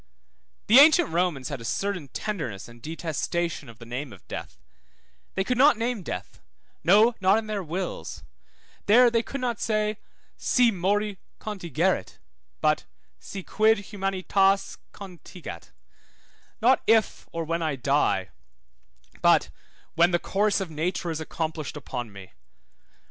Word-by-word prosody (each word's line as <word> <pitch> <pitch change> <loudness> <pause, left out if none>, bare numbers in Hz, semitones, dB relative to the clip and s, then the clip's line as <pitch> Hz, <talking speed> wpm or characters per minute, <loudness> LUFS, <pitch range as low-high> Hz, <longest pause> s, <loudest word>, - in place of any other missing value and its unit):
The 235 +5 +8
ancient 315 +2 +7
Romans 165 -6 0
had 140 -5 -5
a - - -8
certain 185 - -2
tenderness 135 - -4
and 120 0 -15
detestation 165 0 -3
of 115 - -13
the 115 - -12
name 125 +3 -5
of 95 - -15
death; - - -7 0.8
they 190 - +1
could 250 +4 -1
not 280 -3 +6
name 230 -1 -1
death, - - -6 0.4
no, 215 +7 +6
not 190 +2 +5
in 225 - -2
their 215 -2 -3
wills; 180 +2 -5 0.6
there 240 +3 +7
they 230 -1 +2
could 275 +3 -6
not 240 -3 -2
say, 215 -1 0 0.4
Si 245 -2 +3
mori 200 +1 0 0.2
contigerit, 185 -4 -1 0.4
but - - +2 0.3
si 195 -2 -7
quid 215 0 +2
humanitas 195 0 +1
contingat, 180 -2 -10 0.9
not 260 +3 +5
if 220 -1 +2
or 165 0 -3
when 165 +1 -2
I 155 -3 0
die, 135 -7 +1 0.9
but - - +4 0.4
when 170 +2 +4
the 175 - +2
course 205 +4 +1
of 190 -4 -4
nature 170 +2 -2
is 160 0 -4
accomplished 155 -2 -4
upon 125 -5 -5
me. 100 -2 -12
185 Hz, 140 wpm, -26 LUFS, 155-215 Hz, 0.9 s, The